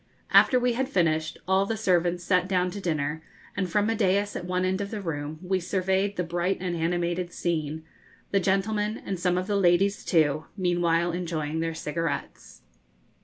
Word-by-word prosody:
After 255 - +6
we 245 0 +1
had 260 +3 -1
finished, 160 - +1
all 190 +1 +3
the 225 - -2
servants 175 -3 +1
sat 180 0 +2
down 180 -1 +1
to 200 - -6
dinner, 155 -3 -1 0.3
and 185 -2 -1
from 205 +4 +2
a 225 - +1
daïs 200 -1 +1
at 175 - -4
one 180 +1 0
end 190 +2 0
of 200 - -3
the 215 - -4
room 155 -4 -4
we 185 +1 0
surveyed 190 +2 0
the 180 - -1
bright 175 +3 -1
and 180 -2 -2
animated 175 +1 -1
scene, 160 -3 -2 0.5
the 195 - +3
gentlemen 210 +3 0
and 190 -3 -3
some 180 0 +1
of 180 - -1
the 205 +1 -1
ladies 195 +2 +3
too 155 -3 +2
meanwhile 175 -2 +1
enjoying 160 -3 -3
their 165 0 -2
cigarettes. 165 +1 -4
180 Hz, 180 wpm, -26 LUFS, 165-195 Hz, 0.5 s, After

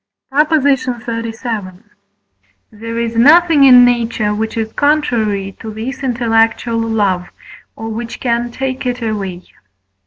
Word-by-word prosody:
PROP. 300 +3 +2 0.2
XXXVII. 230 -6 -3 0.9
There 230 +2 -7
is 235 0 -2
nothing 300 +4 +5
in 250 -2 +8
nature, 230 -3 0
which 220 +2 -3
is 220 -1 -3
contrary 225 -10 0
to 220 - -7
this 230 +6 -6
intellectual 230 -2 0
love, 205 -6 -1 0.5
or 225 0 -6
which 230 +1 -6
can 240 -1 -1
take 260 0 -4
it 245 -1 -3
away. 195 -5 -4
230 Hz, 120 wpm, -15 LUFS, 220-250 Hz, 0.9 s, in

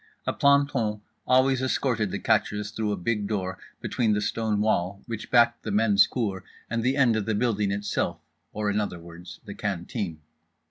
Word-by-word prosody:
A - - 0
planton 140 -7 +2 0.3
always 130 +1 +4
escorted 125 -5 0
the - - -3
catchers 105 0 0
through 110 -1 -2
a 100 - -1
big 105 +2 -1
door, 95 -3 -3 0.2
between 115 -4 +1
the 105 - +1
stone 110 -1 -1
wall, 100 -2 0
which 115 -2 -6
backed 120 -1 +4
the - - -5
men's 105 -1 +4
cour 100 -7 -2 0.3
and 115 0 0
the 130 +4 +1
end 125 -5 +4
of 110 -2 -2
the 110 - +1
building 105 -3 +1
itself, 100 +1 -1 0.3
or, 105 -1 -1
in 105 +1 +1
other 100 -4 -4
words, 85 +1 -11
the 100 - -7
canteen. 95 -3 -4
105 Hz, 180 wpm, -26 LUFS, 100-120 Hz, 0.3 s, always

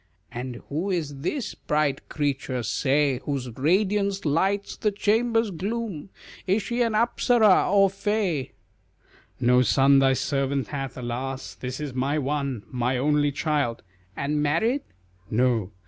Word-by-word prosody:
"And 125 0 -6
who 165 +8 -2
is 155 -7 -2
this 235 - -3
bright 150 -2 -1
creature, 140 -4 -2
say, 135 +3 +1
Whose 135 -4 -3
radiance 195 - +1
lights 190 +7 0
the 215 - 0
chamber's 225 +2 +1
gloom 200 -1 -4 0.4
Is 195 +3 +2
she 240 +4 -2
an 230 -2 +2
Apsara 230 -3 +4
or 200 -1 +6
fay?" 195 -7 -1 0.9
"No 125 +1 +4
son 135 +2 +5
thy 135 -1 +4
servant 135 0 -1
hath, 135 -3 -5
alas! 125 -3 -4
This 125 +7 -6
is 145 -3 -4
my 135 +4 0
one, 140 -5 -2
my 125 0 0
only 145 +2 +2
child;" 140 -5 -1 0.3
"And 150 +1 -1
married?" 220 - +1 0.5
"No." 115 -4 +1
145 Hz, 130 wpm, -25 LUFS, 130-195 Hz, 0.9 s, or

